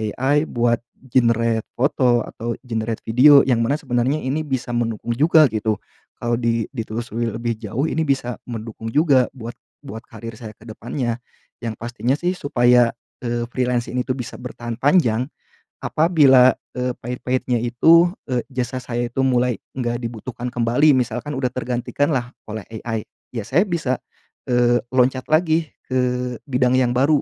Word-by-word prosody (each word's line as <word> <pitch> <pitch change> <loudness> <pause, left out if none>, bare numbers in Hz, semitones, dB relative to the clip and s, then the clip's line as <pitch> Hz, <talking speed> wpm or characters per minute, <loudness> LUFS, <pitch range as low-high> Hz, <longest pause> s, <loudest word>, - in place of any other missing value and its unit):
AI 145 +3 +2
buat 120 -1 +1 0.3
generate 115 -2 +2
foto 125 -2 +2
atau 115 +1 -5
generate 115 -2 -3
video 140 +5 +7
yang 125 -3 +2
mana 130 +5 +1
sebenarnya 125 0 0
ini 140 +5 -1
bisa 130 -3 -2
mendukung 120 -1 -2
juga 155 +4 +5
gitu. 110 0 0 0.5
Kalau 120 0 0
di 115 -2 0
ditelusuri 115 -1 -3
lebih 115 0 -2
jauh 110 +5 -3
ini 160 - 0
bisa 130 -3 -1
mendukung 115 -1 -6
juga 145 -5 +4
buat 120 -2 -8 0.3
buat 115 -5 -8
karier 115 0 -9
saya 110 -2 -8
ke - - -19
depannya. 120 +1 -4 0.4
Yang 115 -2 -4
pastinya 120 +2 -1
sih 175 +4 -1
supaya, 120 -5 +3 0.3
eee, 120 0 -1
freelance 125 -1 0
ini 125 0 -2
itu 130 - 0
bisa 125 -2 -7
bertahan 120 -2 -6
panjang, 130 -4 +3 0.6
apabila, 145 -6 +5 0.2
eee, 125 -1 -2
pahit-pahitnya 125 0 -2
itu, 160 +9 +5 0.2
eee, 125 -3 -1
jasa 130 -1 -3
saya 120 -1 -2
itu 135 - -2
mulai 125 -2 +1 0.2
enggak 120 -1 -2
dibutuhkan 120 +1 -5
kembali, 120 +5 +3
misalkan 125 +4 -2
udah 130 -1 0
tergantikan 125 +3 -1
lah 125 -2 -2 0.2
oleh 110 -2 -5 0.2
AI 115 -2 -3 0.3
ya 115 -4 -4
saya 135 +10 +3
bisa, 150 -7 -1 0.5
eee, 120 -1 +3
loncat 130 0 +2
lagi 160 0 +2 0.2
ke 125 -1 0 0.2
bidang 125 -1 +2
yang 125 -2 +3
baru. 145 +3 +3
125 Hz, 150 wpm, -21 LUFS, 115-130 Hz, 0.6 s, video